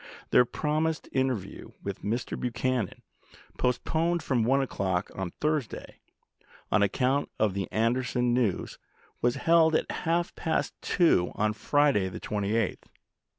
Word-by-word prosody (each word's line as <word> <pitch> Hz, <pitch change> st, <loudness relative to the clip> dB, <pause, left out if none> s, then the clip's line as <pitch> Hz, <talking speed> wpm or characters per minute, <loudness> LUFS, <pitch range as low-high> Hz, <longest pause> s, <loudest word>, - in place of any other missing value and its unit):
Their 125 Hz, -, +6 dB
promised 155 Hz, +4 st, -1 dB
interview 130 Hz, -7 st, -2 dB
with -, -, -5 dB
Mr. 115 Hz, +4 st, -2 dB
Buchanan, 125 Hz, -2 st, -2 dB, 0.6 s
postponed 160 Hz, +7 st, 0 dB
from 125 Hz, -4 st, +1 dB
1 135 Hz, +4 st, +3 dB
o'clock 95 Hz, -9 st, -1 dB
on 95 Hz, -2 st, -3 dB
Thursday, 150 Hz, -, -3 dB, 0.7 s
on 110 Hz, -, +4 dB
account 130 Hz, +7 st, +1 dB
of 105 Hz, -3 st, +2 dB
the 95 Hz, 0 st, -3 dB
Anderson 120 Hz, +2 st, +1 dB
news, 120 Hz, -7 st, 0 dB, 0.4 s
was 120 Hz, 0 st, +2 dB
held 165 Hz, -1 st, +4 dB
at -, -, 0 dB
half 170 Hz, +1 st, -1 dB
past 160 Hz, -, -1 dB
two 160 Hz, -, +3 dB
on 105 Hz, 0 st, +1 dB
Friday 140 Hz, -5 st, +2 dB
the 90 Hz, -, -7 dB
28th. 105 Hz, -2 st, -1 dB
125 Hz, 125 wpm, -28 LUFS, 105-150 Hz, 0.7 s, Their